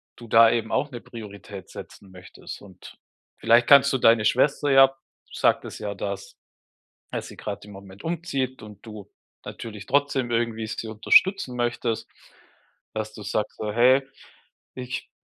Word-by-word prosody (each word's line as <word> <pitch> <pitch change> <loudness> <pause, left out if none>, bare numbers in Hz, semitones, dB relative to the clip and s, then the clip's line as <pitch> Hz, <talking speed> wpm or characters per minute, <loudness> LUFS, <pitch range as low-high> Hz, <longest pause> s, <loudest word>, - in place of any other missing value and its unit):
du 120 - -12
da 115 0 +6
eben 115 -1 -2
auch 145 - 0
'ne 120 -2 -8
Priorität 100 -4 -10
setzen 95 -2 -12
möchtest. 90 0 -11
Und 95 -3 -14 0.4
vielleicht 115 +1 +4
kannst 140 0 +7
du - - +2
deine 115 -3 +4
Schwester 140 +5 +2
ja 135 0 +6 0.4
sagtest - - 0
ja, 105 -1 -4
dass 100 0 -6 0.8
dass - - -4
sie - - -12
gerade - - -6
im - - -11
Moment 100 0 -13
umzieht 140 -7 -3
und 105 -1 -13
du 105 -3 -10 0.3
natürlich 105 -3 -8
trotzdem 140 -3 +1
irgendwie 115 -1 -1
sie 110 +1 -5
unterstützen 125 - +3
möchtest. 120 -1 -2 0.9
Dass 110 0 -4
du 105 - -9
sagst, 105 +1 -3
so: 105 - -3
„Hey, 125 +4 +5 0.7
ich 125 0 -6
115 Hz, 150 wpm, -24 LUFS, 105-130 Hz, 0.9 s, kannst